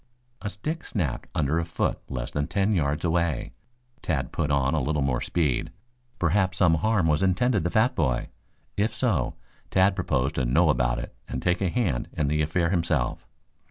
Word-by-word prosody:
A 105 - -3
stick 155 - -4
snapped 85 - -3
under 75 +2 +1
a - - 0
foot 80 0 -1
less 65 -1 -4
than 75 0 -1
ten 100 +1 +1
yards 75 -2 0
away. 85 -4 0 0.5
Tad 70 -7 -1
put 75 - -1
on 70 -1 +2
a 80 - +1
little 75 +1 0
more 65 -3 0
speed. 75 -8 0 0.5
Perhaps 95 +2 +1
some 90 -4 +4
harm 110 -5 +2
was 75 +1 +2
intended 100 +2 +2
the 85 - 0
fat 115 +7 +3
boy. 65 - 0 0.5
If 110 +2 0
so, 110 - 0 0.3
Tad 95 +1 +3
proposed 70 -2 0
to 65 -4 -1
know - - +3
about - - +2
it - - -6
and 65 - -3
take 90 +6 0
a 95 - +2
hand 85 - 0
in 75 -3 +1
the 75 +1 +1
affair 85 +3 +1
himself. 85 -8 0
85 Hz, 185 wpm, -26 LUFS, 70-95 Hz, 0.5 s, some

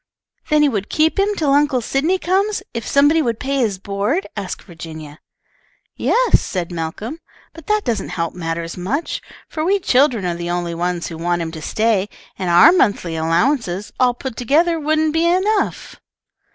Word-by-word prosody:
"Then 300 0 +4
he 295 - +4
would 205 -5 -3
keep 315 +4 +2
him 410 +1 +2
till 300 -6 +1
Uncle 285 -2 +3
Sydney 280 +10 0
comes, 385 +2 0
if 230 -2 -4
somebody 290 +3 +4
would 235 -6 -1
pay 275 +1 -1
his 215 -6 0
board?" 200 - -1
asked 200 -3 -5
Virginia. 160 -4 -10 0.8
"Yes," - - +3
said 180 -2 -4
Malcolm, 175 - -5 0.3
"but 330 -3 -13
that 425 0 +1
doesn't 230 -3 -2
help 165 -1 -3
matters 165 -1 -4
much, 230 - -3 0.3
for 310 - -4
we 385 +5 +3
children 255 - +2
are 175 - 0
the 170 0 -5
only 175 -1 -2
ones 175 0 -2
who 160 - -7
want 175 0 0
him 160 - -5
to 160 -1 -8
stay, 215 +2 0 0.3
and 185 -2 -2
our 175 - +8
monthly 200 - +1
allowances, 180 - 0
all 250 -1 +3
put 260 -1 -6
together, 320 +8 +2
wouldn't 310 0 +1
be 325 +1 +2
enough." 390 +4 0
235 Hz, 175 wpm, -19 LUFS, -, 0.8 s, our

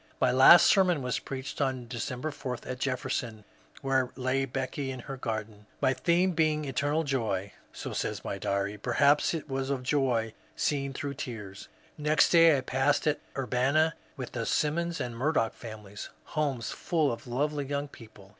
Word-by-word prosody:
My 125 - +3
last 130 +7 +8
sermon 180 -7 +4
was 125 - -1
preached 135 +2 -6
on 130 -3 -1
December 125 +4 -4
4 130 -4 -5
at 125 0 -5
Jefferson, 120 -4 -2 0.4
where 130 -2 +1
lay 130 +1 0
Becky 135 +1 -3
in 130 -1 -5
her 135 - -6
garden, 110 -4 -5
my 130 - +3
theme 170 +8 +2
being 155 -2 +1
"Eternal 145 +4 0
Joy." 110 -9 -2 0.2
So - - -6
says - - -3
my - - -3
diary; 100 +1 -1
perhaps 140 - +3
it 160 - -5
was 135 -1 -2
of 135 -2 -2
joy 125 -5 +1 0.2
seen 140 -2 -1
through 140 +1 -4
tears. 110 -8 -7 0.3
Next 150 +1 +3
day 165 -3 +7
I - - -1
passed 135 +3 +1
at 150 -1 +1 0.2
Urbanna, 135 +5 +2 0.2
with 130 -2 -6
the 115 -2 -3
Simmons 170 +3 0
and 120 -1 -4
Murdoch 130 -2 +1
families, 105 -3 -9
— - - -35
homes 140 -6 -1
full 155 -5 0
of 115 - -7
lovely 145 +4 -1
young 140 +1 -2
people. 110 -7 -15
135 Hz, 170 wpm, -29 LUFS, 120-145 Hz, 0.4 s, last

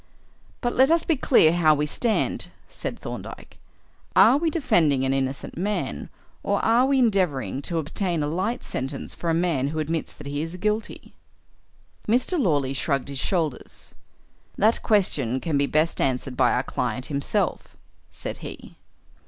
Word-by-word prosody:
"But 240 -1 0
let 265 +2 +4
us 330 0 +3
be 325 - +1
clear 235 - +4
how 160 -3 +4
we 150 +1 0
stand," 220 +9 -1 0.2
said - - -6
Thorndyke. - - -8 0.6
"Are - - +7
we 325 +2 +1
defending 170 - +2
an 135 - +1
innocent 135 0 -3
man 205 +3 -2 0.3
or - - 0
are 240 +3 +4
we 275 0 +2
endeavouring 185 - +1
to 170 +4 -3
obtain 165 +1 -1
a - - -1
light 190 +10 -2
sentence 135 +2 -5
for 170 - -4
a 165 - +2
man 165 -6 +1
who 155 +2 -4
admits 155 +1 -2
that - - -12
he 145 +1 -3
is 165 +2 -5
guilty?" 210 +4 -3 0.9
Mr. 255 - +1
Lawley 145 - +1
shrugged 140 0 -1
his 140 -1 -5
shoulders. 160 -7 -3 0.6
"That 220 +3 +3
question 145 - +1
can 155 +2 -2
be 140 0 +2
best 155 +3 +1
answered 130 -1 -1
by - - +3
our - - +1
client 130 - -3
himself," 140 -2 -2 0.3
said - - -6
he. - - -9
165 Hz, 160 wpm, -24 LUFS, 140-215 Hz, 0.9 s, Are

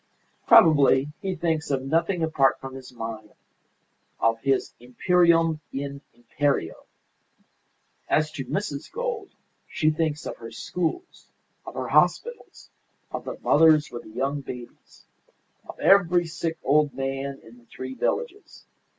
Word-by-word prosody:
Probably 145 -3 +6
he 190 -2 -2
thinks 160 -2 -1
of 135 -2 -1
nothing 165 +5 0
apart 140 -4 +2
from 135 0 -8
his 130 -1 -10
mine; 115 -3 -7 0.9
of 115 0 +2
his 135 +2 0
'Imperium 165 +5 +2
in 140 0 -5
Imperio.' 120 - -2 1.2
As 155 0 +2
to 140 -4 -6
Mrs. 160 -8 -4
Gould, 475 -4 -4 0.4
she 155 -1 +1
thinks 155 -1 -2
of - - -6
her 115 -1 -9
schools, 180 - -4 0.4
of - - -8
her - - -4
hospitals, 480 0 0 0.4
of - - -5
the - - -6
mothers 155 -1 +4
with 120 - -6
the - - -14
young 135 +5 -2
babies, 125 -3 -11 0.6
of - - -10
every 180 -3 +4
sick 165 0 -4
old 145 -1 +2
man 135 +1 -4
in 115 +2 -16
the 120 - -24
three 130 +2 -8
villages. 440 - -4
145 Hz, 135 wpm, -25 LUFS, 130-165 Hz, 1.2 s, Probably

